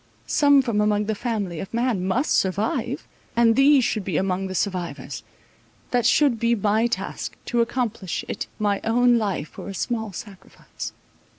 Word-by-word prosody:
Some 285 -2 +4
from 225 -4 0
among 210 0 +2
the 220 - 0
family 205 -7 -3
of 190 - -6
man 235 -6 0
must 250 +10 +1
survive, 225 - 0 0.3
and 230 -1 +4
these 275 0 +6
should 215 -3 0
be 180 -5 -1
among 190 +1 0
the 190 - -5
survivors; 185 -3 -3 0.7
that 245 -2 +3
should 265 -4 +3
be 235 +1 +2
my 215 +2 +2
task—to 240 0 -3
accomplish 230 -6 -2
it - - -4
my 205 -2 0
own 240 +1 +4
life 190 -8 -3
were - - -6
a 195 - -6
small 220 0 -2
sacrifice. 195 0 -9
220 Hz, 160 wpm, -24 LUFS, 195-240 Hz, 0.7 s, these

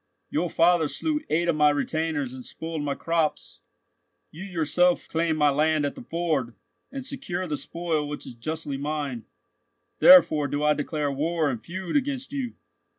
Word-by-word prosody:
Your 165 +4 0
father 165 -1 +3
slew 300 - -1
eight 170 +2 +1
of 170 - +2
my 150 -1 +5
retainers 145 -2 -1
and 130 -1 -8
spoiled 160 +2 -5
my 145 -1 -2
crops. 165 -2 -2 0.7
You 165 +5 -9
yourself 180 -1 +1
claim 165 -1 0
my 150 -1 +4
land 155 +1 +2
at 145 - -2
the - - -10
ford, 160 - -2 0.4
and 270 -1 -6
secure 240 -10 -4
the 155 -4 -2
spoil 160 -1 -3
which 145 - -6
is - - -8
justly 150 +3 -4
mine. 145 -5 -3 0.7
Therefore 155 - +7
do 145 +2 -2
I 150 0 +4
declare 150 -1 -2
war 155 +1 0
and 120 -3 -6
feud 185 0 -5
against 275 -1 -1
you. 260 -4 -3
160 Hz, 165 wpm, -26 LUFS, 145-175 Hz, 0.7 s, Therefore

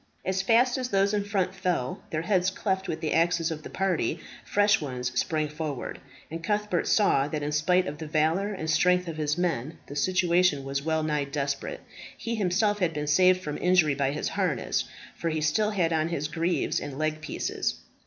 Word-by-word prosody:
As 190 0 0
fast 240 +5 +3
as 250 -1 -3
those 200 0 +2
in 205 -1 +1
front 195 -2 -1
fell, 180 -9 -2
their 155 0 -2
heads 185 0 +2
cleft 190 0 -2
with 160 - -3
the 155 - -1
axes 165 0 +2
of 155 -1 -5
the - - -9
party, 185 -4 0 0.2
fresh 205 0 +3
ones 125 -3 -3
sprang 155 +4 0
forward; 150 -3 -5 0.3
and 165 +1 -5
Cuthbert 210 -3 0
saw 145 -10 +3
that 150 0 -3
in 145 - -2
spite 180 +5 +2
of 150 -4 -5
the 160 - -5
valour 160 +7 +1
and 175 -6 -5
strength 180 +3 +3
of 165 -2 -5
his 150 0 0
men, 160 -4 -1
the 145 - -9
situation 175 -2 +2
was 135 0 -2
well 160 +1 0
nigh 150 -2 0
desperate. 140 0 -3 0.4
He 230 - -4
himself 205 0 +1
had 170 -4 0
been 150 0 -2
saved 185 +5 +4
from 150 -4 -4
injury 180 -5 +4
by 140 -1 0
his 150 - -2
harness, - - -1 0.3
for 165 - -2
he 155 -1 -1
still 185 +8 +2
had 175 -6 +1
on 160 0 +1
his 150 -3 -2
greaves 165 +3 0
and 140 -2 -6
leg 155 0 -1
pieces. - - -2
165 Hz, 200 wpm, -27 LUFS, 150-190 Hz, 0.4 s, saved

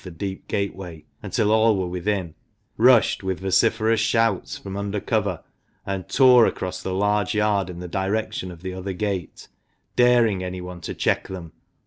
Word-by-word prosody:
the 90 - -8
deep 95 +3 -6
gateway 90 -5 -4 0.2
until 105 -1 0
all 110 -1 +4
were 95 - -1
within, 90 -1 -2 0.4
rushed, 120 0 +4
with 95 -2 -3
vociferous 110 +4 +2
shouts, 115 +1 +1
from 95 -1 -8
under 100 +1 -2
cover, 100 -5 -1 0.4
and 95 -2 -4
tore 125 -3 +6
across 90 0 -4
the 95 - -4
large 105 0 +1
yard 105 -3 +1
in 90 - -7
the 90 0 -6
direction 95 +1 -2
of 85 -1 -12
the 95 0 -4
other 95 +1 -5
gate, 95 -3 -4 0.5
daring 120 -6 +4
anyone 90 -1 -6
to - - -6
check - - 0
them. 90 -4 -8
95 Hz, 160 wpm, -23 LUFS, 90-110 Hz, 0.5 s, tore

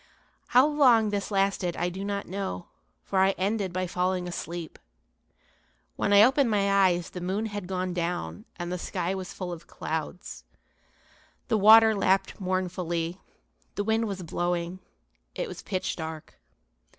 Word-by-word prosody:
How 250 +2 +6
long 250 -8 +4
this 200 -1 -2
lasted 195 -3 0
I 175 - 0
do 190 +2 -6
not 200 0 -3
know, 190 - -5 0.3
for 195 - -1
I 190 +1 +4
ended 195 0 -1
by 185 +1 -1
falling 180 0 -1
asleep. 170 -1 -6 1.2
When - - 0
I 205 +1 +8
opened 265 +1 +4
my 200 -2 +4
eyes 175 -1 -1
the 180 - -7
moon 190 +5 -1
had 205 -4 -5
gone 185 -1 -2
down 165 - -3
and 175 0 -5
the 180 - -3
sky 170 +2 -2
was 190 -2 -5
full 180 -2 -5
of 170 0 -11
clouds. 160 +3 -5 1.1
The 220 - +3
water 220 +2 +8
lapped 195 -1 +1
mournfully, 180 -2 -2 0.5
the 205 - -1
wind 220 +1 +1
was 195 -3 -5
blowing, 175 +1 -2 0.6
it - - -2
was - - -8
pitch 185 -2 -3
dark. 160 -2 -7
185 Hz, 150 wpm, -27 LUFS, 175-205 Hz, 1.2 s, I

